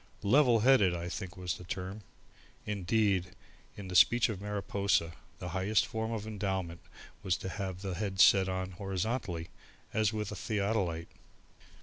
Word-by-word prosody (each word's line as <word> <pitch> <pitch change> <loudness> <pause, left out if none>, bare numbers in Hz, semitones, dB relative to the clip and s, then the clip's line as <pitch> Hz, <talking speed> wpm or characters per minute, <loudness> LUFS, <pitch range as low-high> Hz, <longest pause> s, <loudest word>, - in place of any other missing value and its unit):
"Level 120 +1 +5
headed" 110 -8 +5
I 85 +1 -4
think 95 0 -6
was 90 -2 -3
the - - -9
term; 95 +3 -5 0.6
indeed 100 -2 0 0.4
in 100 -2 -7
the 90 - -6
speech 120 +5 +6
of 100 -3 -4
Mariposa, 100 -4 0 0.3
the 90 - -6
highest 95 +5 +1
form 110 -1 -3
of 110 -2 -3
endowment 95 -5 -3 0.4
was 90 -2 0
to 95 - -5
have 95 -2 -5
the 95 -2 -3
head 95 0 -3
set 95 -1 +6
on 95 0 -3
horizontally 95 -1 -3 0.4
as 110 -1 +2
with 105 -2 -3
a - - -5
theodolite. 100 -7 -1
100 Hz, 150 wpm, -31 LUFS, 90-110 Hz, 0.6 s, speech